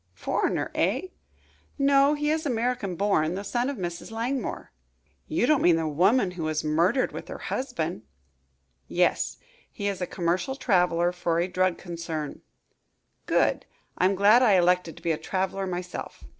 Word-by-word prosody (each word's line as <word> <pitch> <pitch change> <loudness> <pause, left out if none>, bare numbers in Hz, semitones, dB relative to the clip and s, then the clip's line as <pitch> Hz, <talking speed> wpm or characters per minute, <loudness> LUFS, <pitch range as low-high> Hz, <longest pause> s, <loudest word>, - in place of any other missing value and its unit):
"Foreigner, - - -1
eh?" 370 - 0 0.7
"No, 280 +1 +4
he 295 0 0
is 315 0 0
American 240 - -1
born 180 -4 +1
the 200 - -4
son 240 +5 -1
of 280 - -4
Mrs. 175 -2 -5
Langmore." 235 +3 -3 0.6
"You 160 - +1
don't 305 +1 +3
mean 175 -1 +5
the 165 -1 -1
woman 185 - +3
who 180 -2 -7
was 155 0 -1
murdered 170 - +2
with - - -8
her - - -6
husband?" 175 - -3 0.9
"Yes. - - +1 0.3
He 205 - -4
is 195 -2 -3
a 180 - -1
commercial 180 +9 -1
traveler 180 -8 +2
for 170 -2 -1
a 175 - +1
drug 185 -1 +1
concern." 165 -4 -5 0.9
"Good! - - +1 0.3
I'm 190 +2 +2
glad 205 +5 +6
I 230 -5 +5
elected 180 -2 +2
to - - -14
be 170 - +1
a 155 - -1
traveler 190 0 -2
myself." 180 0 -6
185 Hz, 155 wpm, -26 LUFS, 170-240 Hz, 0.9 s, glad